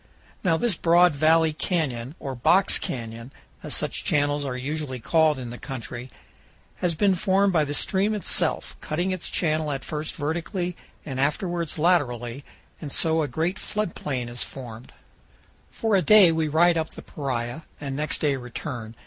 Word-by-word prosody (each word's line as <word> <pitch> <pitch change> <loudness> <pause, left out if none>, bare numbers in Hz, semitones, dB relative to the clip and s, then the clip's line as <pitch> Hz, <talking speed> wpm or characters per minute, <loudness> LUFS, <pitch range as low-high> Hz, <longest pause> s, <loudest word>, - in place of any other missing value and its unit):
Now 165 -4 +3
this 235 +3 +1
broad 175 0 +4
valley 160 +2 +4
canyon, 145 -6 -2
or 135 -2 -4
"box 180 +10 +3
canyon," 115 0 -5 0.3
as - - -1
such - - 0
channels 145 0 +1
are 125 -2 -3
usually 140 0 -3
called 155 +4 +3
in 125 -2 -6
the 120 - -8
country, 125 -2 -6 0.7
has 175 -2 0
been 195 +4 +3
formed 195 +1 +2
by 155 -3 +3
the 145 0 -2
stream 205 +5 +1
itself, 120 - 0
cutting 175 +5 -1
its 185 -2 -3
channel 155 -2 0
at 135 -2 -3
first 150 0 -4
vertically 170 +4 -2 0.3
and 130 -3 -4
afterwards 170 +4 -1
laterally, 140 -7 +1 0.4
and 150 -3 -6
so 160 +2 +2
a 150 - 0
great 170 +6 -1
flood 210 -4 -3
plain 130 -4 -3
is 120 -1 -7
formed. 120 0 -8 0.8
For 225 -2 0
a 190 - +4
day 205 -4 +7
we 160 -1 0
ride 165 +2 +4
up 160 - -2
the - - -9
Paria, 125 0 -4 0.2
and 140 -2 -4
next 150 +2 -2
day 145 -3 +2
return. 125 -2 -6
155 Hz, 165 wpm, -25 LUFS, 130-175 Hz, 0.8 s, day